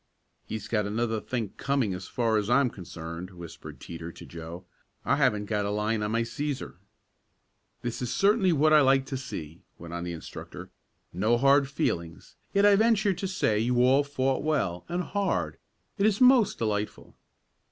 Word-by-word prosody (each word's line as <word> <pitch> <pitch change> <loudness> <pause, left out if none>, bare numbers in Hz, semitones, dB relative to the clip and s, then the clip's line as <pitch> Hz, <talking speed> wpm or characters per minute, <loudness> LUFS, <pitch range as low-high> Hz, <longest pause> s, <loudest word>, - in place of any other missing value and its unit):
"He's 110 -2 -5
got 105 -3 0
another 110 +1 -1
think 115 -5 -4
coming 135 -8 0
as 90 0 -6
far 115 -3 +1
as 105 +1 -1
I'm 125 0 +3
concerned," 85 -1 -8
whispered 85 -3 -10
Teeter 85 0 -7
to - - -12
Joe. 85 +1 -9 0.4
"I - - +2
haven't 105 0 +2
got 105 -1 -1
a 100 - -1
line 105 +1 0
of 105 - -1
my 115 +1 +1
Cæsar." 140 +4 -4 1.1
"This 120 0 -3
is 125 -1 -2
certainly 200 -2 +3
what 155 0 +4
I 155 - +8
like 135 -1 +4
to 135 - -5
see," 85 - -7 0.2
went 85 0 -9
on 85 0 -4
the 85 0 -4
instructor. 80 - -9 0.4
"No 110 +7 +2
hard 140 +2 +4
feelings, 85 - -3 0.2
yet 200 +1 +3
I 205 -1 +7
venture 215 -2 +3
to 190 +2 -4
say 145 - +1
you 120 +2 +2
all 135 +3 +5
fought 135 -2 -1
well, 140 - -1
and 175 +1 -1
hard. 200 0 -1 0.4
It 200 - +4
is 210 -2 +1
most 250 -5 +5
delightful." 105 -2 -3
120 Hz, 175 wpm, -28 LUFS, 100-145 Hz, 1.1 s, I